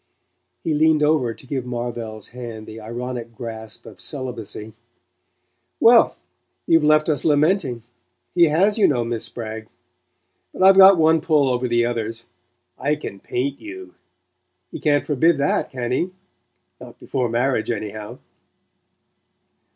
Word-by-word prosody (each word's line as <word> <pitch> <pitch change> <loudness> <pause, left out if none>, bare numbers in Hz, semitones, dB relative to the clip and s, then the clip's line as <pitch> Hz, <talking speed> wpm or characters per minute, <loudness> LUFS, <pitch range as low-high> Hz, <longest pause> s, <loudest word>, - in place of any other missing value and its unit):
He 160 - 0
leaned 155 0 +3
over 150 -6 +2
to - - -16
give 130 -1 -3
Marvell's 120 -3 -5
hand 115 -3 -8
the 110 +1 -10
ironic 120 +1 -6
grasp 110 -3 -7
of 100 -5 -12
celibacy. 115 -4 -5 1.1
"Well, - - +6 0.5
you've 165 -1 +4
left 155 0 +4
us 155 -3 0
lamenting: 150 - +1 0.5
he 175 -1 +5
has, 190 +8 +2
you 205 - +6
know. 125 -5 +1
Miss 115 -1 -2
Spragg. 110 -1 -7 0.9
But - - -1
I've 195 0 +8
got 195 -1 +9
one 160 0 +4
pull 150 -4 +2
over 125 +1 -1
the 120 0 +2
others 115 -1 -3 0.5
I 150 +2 +1
can 100 -9 -8
paint 135 +7 -3
you! 370 +3 -9 0.8
He - - -7
can't 145 -3 +1
forbid 155 +3 +2
that, 140 +1 0
can 125 -2 -4
he? 170 +8 0 0.7
Not - - -12
before 125 -3 -2
marriage, 120 0 0
anyhow!" 105 -2 -5
125 Hz, 135 wpm, -21 LUFS, 115-155 Hz, 1.1 s, got